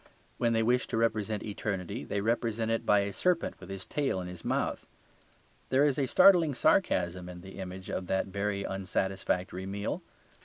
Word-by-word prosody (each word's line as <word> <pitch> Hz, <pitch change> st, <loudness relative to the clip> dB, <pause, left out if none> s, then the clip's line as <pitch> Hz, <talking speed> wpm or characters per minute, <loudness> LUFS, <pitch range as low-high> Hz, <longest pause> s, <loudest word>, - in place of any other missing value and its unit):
When 120 Hz, -1 st, +2 dB
they 115 Hz, 0 st, +2 dB
wish 125 Hz, +2 st, +2 dB
to 115 Hz, -, -2 dB
represent 110 Hz, -2 st, 0 dB
eternity, 100 Hz, +1 st, -3 dB
they 100 Hz, -, -2 dB
represent 115 Hz, 0 st, 0 dB
it 115 Hz, -, -1 dB
by 105 Hz, -1 st, +5 dB
a 100 Hz, 0 st, -3 dB
serpent 180 Hz, -, 0 dB
with 90 Hz, -, -11 dB
his 95 Hz, -1 st, -6 dB
tail 140 Hz, -9 st, -1 dB
in 90 Hz, -, -5 dB
his 90 Hz, -2 st, -9 dB
mouth. -, -, -1 dB, 0.8 s
There 135 Hz, +2 st, +4 dB
is 145 Hz, -1 st, +1 dB
a 135 Hz, -, +1 dB
startling 170 Hz, -3 st, +6 dB
sarcasm 90 Hz, -, +2 dB
in 90 Hz, -1 st, -9 dB
the 95 Hz, +2 st, -10 dB
image 95 Hz, 0 st, -7 dB
of 90 Hz, -, -3 dB
that 95 Hz, +1 st, +1 dB
very 100 Hz, +1 st, -2 dB
unsatisfactory 95 Hz, -1 st, -2 dB
meal. 100 Hz, +1 st, -3 dB
100 Hz, 180 wpm, -30 LUFS, 95-115 Hz, 0.8 s, startling